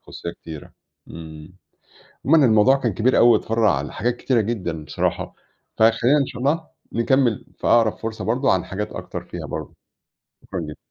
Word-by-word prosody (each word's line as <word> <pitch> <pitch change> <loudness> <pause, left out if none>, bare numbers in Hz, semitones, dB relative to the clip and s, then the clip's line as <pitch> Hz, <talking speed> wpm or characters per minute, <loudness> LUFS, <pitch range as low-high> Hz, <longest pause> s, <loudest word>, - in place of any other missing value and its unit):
خصوصيّة 85 - -7
كتيرة 80 -3 -11 0.4
امم. 80 +2 -10 0.7
عمومًا 150 -1 +6
الموضوع 110 +4 +5
كان 120 -8 -2
كبير 120 +5 +2
أوي 120 - +7
واتفرّع 110 -10 +2
لحاجات 120 +10 -2
كتيرة 125 -3 +1
جدًا 90 -8 -3
بصراحة، - - -2 0.4
فخلينا 115 +6 +4
إن 140 - +1
شاء 125 -2 -8
الله 160 +4 0 0.2
نكمل 120 -1 +1
في - - -4
أقرب 115 -2 +3
فرصة 110 -1 -5
برضو 125 +5 0
عن 95 - +2
حاجات 105 +2 -5
أكتر - - -7
فيها - - -7
برضو. - - -6 0.7
شكرًا 95 - -5
جدًا. 75 -1 -7
115 Hz, 160 wpm, -22 LUFS, 95-125 Hz, 0.7 s, أوي